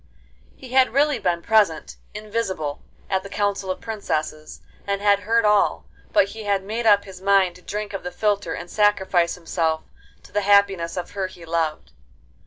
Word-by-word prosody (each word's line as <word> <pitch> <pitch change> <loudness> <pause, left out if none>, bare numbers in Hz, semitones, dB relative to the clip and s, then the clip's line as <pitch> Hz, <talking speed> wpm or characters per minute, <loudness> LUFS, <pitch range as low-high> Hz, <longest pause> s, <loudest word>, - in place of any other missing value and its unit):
He 260 - -12
had 260 0 +3
really 295 +1 +3
been 170 -2 -1
present, 215 -7 +2 0.2
invisible, 205 -9 -3 0.3
at 190 -1 0
the 200 - -10
council 200 -2 -1
of 185 - -3
princesses, 155 -8 -4 0.3
and 200 0 0
had 200 0 +3
heard 225 +3 +1
all; 210 -1 +2 0.3
but 200 - +3
he 220 +2 -8
had 200 -1 +1
made 225 +3 -2
up 205 -1 +6
his 190 -2 -11
mind 195 -2 +3
to - - -18
drink 210 +2 -5
of 195 - -4
the - - -5
philtre, 205 0 -1
and 170 - -7
sacrifice 190 -4 +2
himself 165 -2 -1 0.4
to - - -17
the 205 - 0
happiness 195 -4 +3
of 180 - -4
her 195 -2 -2
he 175 -2 -13
loved. 160 - -2
200 Hz, 180 wpm, -23 LUFS, 175-210 Hz, 0.4 s, up